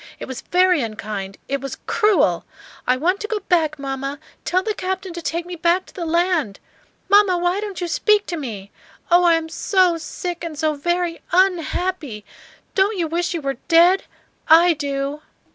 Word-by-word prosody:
It - - -7
was 260 -2 -6
very 360 -3 +3
unkind; 210 -3 -5
it 275 -1 -2
was 275 -1 -5
cru 425 -2 +3
el. - - +1 0.4
I 255 +1 +3
want 360 +8 +1
to 430 - -4
go 435 0 -1
back, 320 -5 +1
mamma. 275 0 -4 0.3
Tell 370 +1 +1
the 430 - -1
captain 380 -1 -4
to 345 - -6
take 335 +1 -3
me 355 0 -6
back 345 +2 +1
to - - -18
the 340 -3 -5
land. 335 - +1 0.5
Mamma, 400 -2 +5
why 355 +3 0
don't 410 -3 -5
you 350 - -2
speak 415 +6 +2
to 350 - -4
me? 215 -10 -6 0.4
Oh, 350 +1 +6
I 340 -1 +5
am 325 -1 -2
so 355 +1 +2
sick 345 +2 -5
and 325 -3 -5
so 310 +1 +1
very 345 +3 -1
un 370 0 +4
happy. 310 - -4 0.5
Don't 400 +2 +2
you 340 -2 0
wish 345 +2 -1
you 330 - -3
were 275 -2 -2
dead? 350 +3 +5 0.4
I 335 +2 +7
do!" 285 0 -3
340 Hz, 190 wpm, -21 LUFS, 290-365 Hz, 0.5 s, I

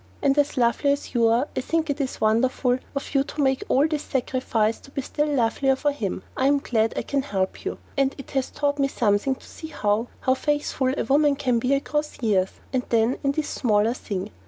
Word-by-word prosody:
And 275 -1 +4
as 290 -1 +1
lovely 245 +3 +3
as 285 - -6
you 235 -2 +4
are 235 +5 +2
I - - 0
think 325 +4 0
it 285 0 -1
is 265 - -3
wonderful 245 +3 +2 0.2
of 275 - -4
you 275 -1 +3
to 295 +1 -4
make 265 -1 +1
all 280 +4 +4
this 305 -2 -2
sacrifice 245 -5 0
to - - -16
be 275 -1 -4
still 295 +3 -1
lovelier 270 0 +2
for 290 +2 0
him. 205 -10 -4
I 260 - +2
am 285 +1 +4
glad 225 -5 0
I - - -1
can 280 -1 0
help 190 -8 -2
you, - - -3 0.2
and 275 -1 +1
it 275 - -10
has 270 -1 -1
taught 285 0 -1
me 275 - +3
something 230 0 +1
to - - -17
see 315 - -9
how 220 -6 0
how 260 - +3
faithful 290 -2 0
a - - 0
woman 290 +1 +3
can 255 -4 +1
be 255 +4 +2
across 295 +2 -2
years 195 -5 +2 0.2
and 260 - +2
then 230 +2 +2
in 275 0 +2
this 305 0 -2
smaller 220 -1 +2
thing! 200 -4 -5
265 Hz, 225 wpm, -24 LUFS, 230-285 Hz, 0.2 s, And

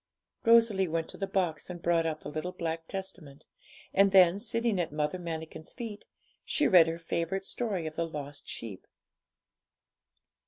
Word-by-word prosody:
Rosalie 230 -5 +5
went 165 0 -2
to - - -7
the 195 - -2
box 180 -5 -1
and 175 -1 -6
brought 170 -1 +2
out 155 -1 -3
the - - -7
little 155 +4 -4
black 165 -2 -4
Testament, 185 -7 -7 0.5
and 195 0 +5
then, 185 -1 +6
sitting 230 -2 +1
at 165 - -3
Mother 150 +4 -1
Manikin's 160 -2 -6
feet, 225 -4 -7 0.4
she 300 - +2
read 175 -3 +7
her 165 0 -2
favourite 170 +3 -2
story 200 -9 -2
of 155 0 -6
the 165 - 0
lost 145 -2 -7
sheep. 105 -5 -7
170 Hz, 160 wpm, -30 LUFS, 160-195 Hz, 0.5 s, read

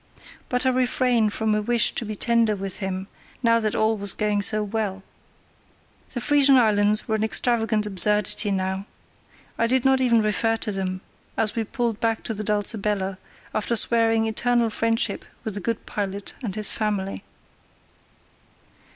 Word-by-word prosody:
But 250 +1 -1
I - - +4
refrained 250 -3 +2
from 220 0 0
a 210 - +1
wish 235 +1 +2
to 235 - -4
be 215 0 -5
tender 230 0 +2
with 195 -1 -3
him, 190 -1 -4 0.4
now 230 0 +4
that 215 -2 -1
all 220 +1 +2
was 200 -2 -2
going 210 -1 0
so 215 +1 +2
well. 205 -2 -3 1.1
The 245 - -3
Frisian 280 +1 +4
Islands 210 -3 +3
were 220 - -1
an 215 0 0
extravagant 220 -1 +1
absurdity 210 +1 +2
now. 190 +1 -2 0.7
I 230 - +3
did 260 +1 +1
not 265 0 +4
even 235 -3 +3
refer 225 +2 +1
to 215 - -3
them 185 -1 -3 0.4
as 215 -1 +1
we 230 - 0
pulled 235 -1 -2
back 225 -1 -1
to 225 - -2
the 215 0 -5
Dulcibella, 205 -2 -1 0.3
after 215 +2 0
swearing 225 0 +3
eternal 235 +1 +1
friendship 225 +1 0 0.2
with 220 - -4
the 205 - -1
good 230 +4 -3
pilot 200 -1 -4
and 210 -7 -4
his 215 -2 0
family. 205 -3 -2
215 Hz, 160 wpm, -24 LUFS, 205-230 Hz, 1.1 s, I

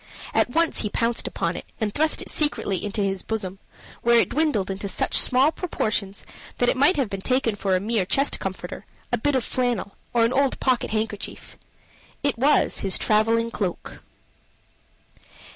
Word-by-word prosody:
At - - +2
once 330 +5 +2
he 210 - 0
had - - -9
pounced 230 0 0
upon - - -2
it, - - -7
and 215 -3 -1
thrust 310 +1 +1
it - - -6
secretly 245 - 0
into 205 0 -2
his 195 -1 -1
bosom, 195 -4 -4 0.4
where 235 0 +5
it - - +2
dwindled 285 -11 0
into 195 +1 -4
such 190 - -1
small 260 +4 +4
proportions 215 - -3 0.3
that 245 - +2
it - - +2
might 285 +8 +4
have 275 -5 +1
been 195 -1 -5
taken 255 0 +1
for 195 -2 0
a - - +2
mere 215 +1 0
chest 275 +7 +1
comforter, - - -6 0.3
a - - +1
bit 290 -1 +1
of 255 - +1
flannel, 245 -6 -1 0.2
or 235 -1 +3
an 235 - 0
old 275 0 +1
pocket 255 -2 +1
handkerchief. 215 -1 -4 0.7
It 285 -2 +1
was 290 +4 +3
his 190 -2 +2
traveling 225 +2 +2
cloak! 185 -6 -4
230 Hz, 175 wpm, -24 LUFS, 200-265 Hz, 0.7 s, where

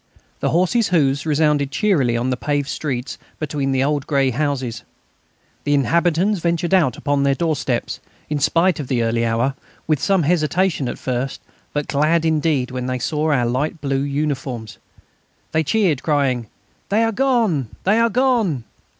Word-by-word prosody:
The - - 0
horses' 185 +7 +2
hoofs 145 -4 +1
resounded 150 -2 +2
cheerily 140 - +1
on 125 +2 -1
the - - +1
paved 145 +2 -1
streets 130 -4 -4 0.2
between 145 -2 -2
the 135 0 +2
old 145 0 -1
grey 135 -3 +2
houses. 130 -3 -2 0.8
The 145 0 +2
inhabitants 170 - +2
ventured 170 +1 0
out 160 -10 +3
upon 145 -1 0
their 140 0 +2
doorsteps, 145 -6 -1 0.3
in 150 -1 -2
spite 165 +4 +2
of 145 - -4
the 125 -3 0
early 115 +1 0
hour, 115 +4 +1 0.3
with 155 -4 0
some 195 -3 +2
hesitation 165 -2 +1
at - - -5
first, 130 +1 -3 0.3
but 145 -1 -2
glad 155 +3 +2
indeed 155 -5 +1
when 125 -1 -4
they 130 0 -1
saw 155 +4 -1
our 125 -4 +2
light 135 +7 -1
blue 135 -2 -1
uniforms; 140 -6 -3 0.7
they 160 - +2
cheered, 175 -5 +1
crying: 135 -6 0 0.4
"They 215 +3 +3
are 225 - +1
gone!... 225 - +1 0.2
they 210 +4 +3
are 230 0 +3
gone!" 230 - +1
145 Hz, 160 wpm, -20 LUFS, 135-170 Hz, 0.8 s, out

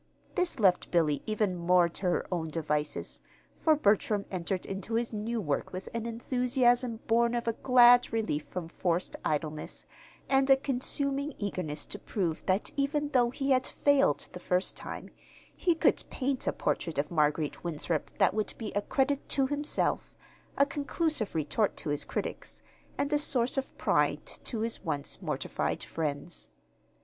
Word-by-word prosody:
This 355 -7 0
left 185 -4 +3
Billy 155 -5 +2
even 215 -3 0
more 175 0 +4
to 170 - -11
her 175 - +1
own 170 -3 -1
devices, 150 -1 -2 0.3
for 315 -1 +3
Bertram 210 -5 +2
entered 185 0 -2
into 195 +4 -4
his 235 0 0
new 225 +2 -2
work 150 -8 -2
with 185 +1 -6
an 230 0 -3
enthusiasm 245 0 +1
born 235 +1 +3
of 235 -1 -2
a 230 - +2
glad 245 0 +6
relief 215 -10 -1
from 180 -3 -6
forced 175 +1 -1
idleness, 155 0 -3 0.4
and 270 0 +3
a 270 - +8
consuming 275 +2 -1
eagerness 180 -7 -3
to 205 - -6
prove 175 -6 -2
that 190 +2 +1
even 290 +1 0
though 245 -4 +3
he 270 +2 -2
had 255 -1 +3
failed 280 - +2
the 180 - -7
first 180 +1 0
time, - - -7 0.4
he 345 -2 +2
could - - +2
paint 265 0 -2
a - - +4
portrait 165 - -2
of 145 +3 -1
Marguerite 150 -1 +1
Winthrop 165 -1 -2
that - - +4
would 215 0 -1
be 220 -3 -5
a 205 - 0
credit 275 +5 0
to 270 -2 +3
himself, 290 +2 0 0.4
a 280 - +6
conclusive 290 - -1
retort 160 +7 0
to - - -4
his 145 0 0
critics, - - -5 0.3
and 285 +1 0
a 295 - +4
source 255 -4 +2
of 270 -1 -3
pride - - +1
to 225 -4 -5
his 225 -2 -2
once 145 -5 -3
mortified - - -2
friends. 155 +1 -3
220 Hz, 160 wpm, -30 LUFS, 170-265 Hz, 0.4 s, a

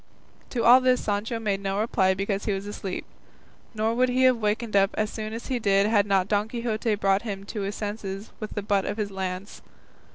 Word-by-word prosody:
To 240 - -1
all 250 +2 +8
this 255 -1 +3
Sancho 210 +3 -1
made 205 -3 -1
no 195 0 -1
reply 190 -4 +2
because 195 +1 -2
he 210 - +1
was 195 +1 -4
asleep, 200 -2 -5 0.7
nor 220 +1 +1
would 250 +2 +2
he 255 +1 +2
have 255 -1 +5
wakened 215 0 -1
up 195 0 +3
so 215 - +2
soon 215 0 -5
as 230 +1 -6
he 255 -2 -1
did 200 -3 +3
had 210 -1 +3
not 195 -2 +2
Don 205 +1 +1
Quixote 230 -2 -1
brought 195 -1 +2
him 200 -4 -5
to 205 +1 -5
his 200 +1 -3
senses 205 -1 -5
with 215 - -6
the 205 - -2
butt 200 -1 +1
of - - -3
his 205 -2 -2
lance. 190 0 -5
210 Hz, 220 wpm, -26 LUFS, 195-225 Hz, 0.7 s, all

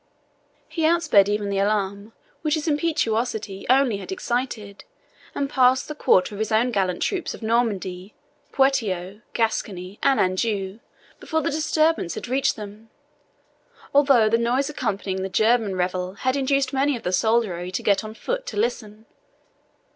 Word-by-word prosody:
He 330 - -5
outsped 315 - +4
even 205 -1 -1
the 195 - 0
alarm 200 +1 -1 0.3
which 310 -1 +1
his 310 +1 -4
impetuosity 230 - -1
only 260 -4 +4
had 200 - -8
excited, 240 - -3 0.5
and 280 - -1
passed 260 0 +3
the 300 - -5
quarter 190 -9 +2
of 205 - -7
his 220 +1 -2
own 230 +3 +2
gallant 190 -5 0
troops 370 -4 -2
of - - -13
Normandy, 205 -5 -1 0.4
Poitou, 210 -8 0
Gascony, 205 -4 -2
and 275 -1 +3
Anjou 195 +1 -1 0.4
before 320 -1 -2
the - - 0
disturbance 310 - +1
had - - -6
reached 265 +3 +1
them, 210 +1 -10 1.0
although 275 -6 +5
the 230 +2 +2
noise 255 +5 0
accompanying 200 -7 -3
the 190 - -3
German 220 0 +2
revel 180 0 -2
had 260 +5 -1
induced 275 -1 +1
many 275 +1 +2
of - - -12
the 180 - -1
soldiery 190 -3 +1
to 185 - -3
get 200 +1 +2
on 215 0 -8
foot - - -4
to 210 - -5
listen. 215 -1 -2
225 Hz, 155 wpm, -23 LUFS, 200-270 Hz, 1.0 s, although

